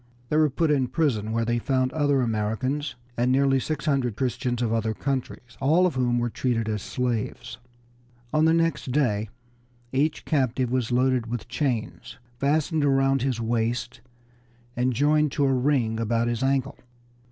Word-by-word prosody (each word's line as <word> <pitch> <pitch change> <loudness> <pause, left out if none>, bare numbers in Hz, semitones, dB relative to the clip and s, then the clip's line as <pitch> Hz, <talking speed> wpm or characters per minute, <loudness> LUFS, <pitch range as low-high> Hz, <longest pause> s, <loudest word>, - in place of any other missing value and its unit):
They 150 - +1
were 155 -1 +4
put 155 +3 0
in 135 -3 +2
prison, 120 -9 0
where 115 0 0
they 120 +1 0
found 130 +1 0
other 145 -3 +2
Americans, 120 +5 -2 0.2
and 120 +2 +1
nearly 135 0 +3
six 155 +3 -3
hundred 135 -7 +1
Christians 125 -1 -2
of 115 -1 0
other 110 -1 0
countries, 130 -3 -4
all 160 +7 +3
of 180 - +1
whom 125 -2 +1
were 120 -1 -1
treated 115 -3 -1
as 105 -2 -2
slaves. 120 -1 -3 0.7
On 155 +1 +3
the 160 - +4
next 165 -5 0
day 110 -7 +1 0.6
each 145 +4 0
captive 130 -4 0
was 125 -2 0
loaded 125 -1 +2
with 120 -1 -5
chains, 115 - -3 0.2
fastened 155 +2 +1
around 135 -1 +2
his 130 -2 -1
waist 115 +2 -2 0.7
and 125 +1 +1
joined 150 +3 +2
to 145 - +1
a 135 - +2
ring 125 -4 +1
about 115 +1 0
his 120 0 -2
ankle. 135 +1 0
130 Hz, 165 wpm, -25 LUFS, 115-140 Hz, 0.7 s, were